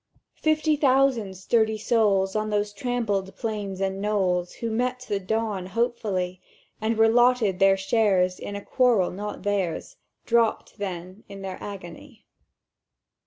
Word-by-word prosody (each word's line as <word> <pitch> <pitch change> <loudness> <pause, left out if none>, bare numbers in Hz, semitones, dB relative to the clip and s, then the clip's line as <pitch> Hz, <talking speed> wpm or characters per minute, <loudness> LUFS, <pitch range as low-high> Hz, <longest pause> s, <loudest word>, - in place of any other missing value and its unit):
"Fifty 310 0 +2
thousand 265 -8 +2
sturdy 220 +3 +1
souls 205 -4 +2
on 215 0 0
those 205 0 -1
trampled 205 -4 -2
plains 205 -4 -4
and 195 0 -2
knolls, 185 -4 0
Who 230 -1 -4
met 250 +2 -1
the 200 - -1
dawn 205 -1 -2
hopefully, 195 -4 -1 0.4
And 220 +1 0
were 225 0 +6
lotted 235 -4 +3
their 195 0 +5
shares 190 -2 +2
in 205 - -6
a 200 - -7
quarrel 240 -8 +3
not 205 +2 -6
theirs, 205 - -2 0.3
Dropt 230 -2 +1
then 185 +1 -6
in 195 -1 -9
their 190 -1 -6
agony. 185 -4 -9
205 Hz, 135 wpm, -25 LUFS, 190-230 Hz, 0.4 s, were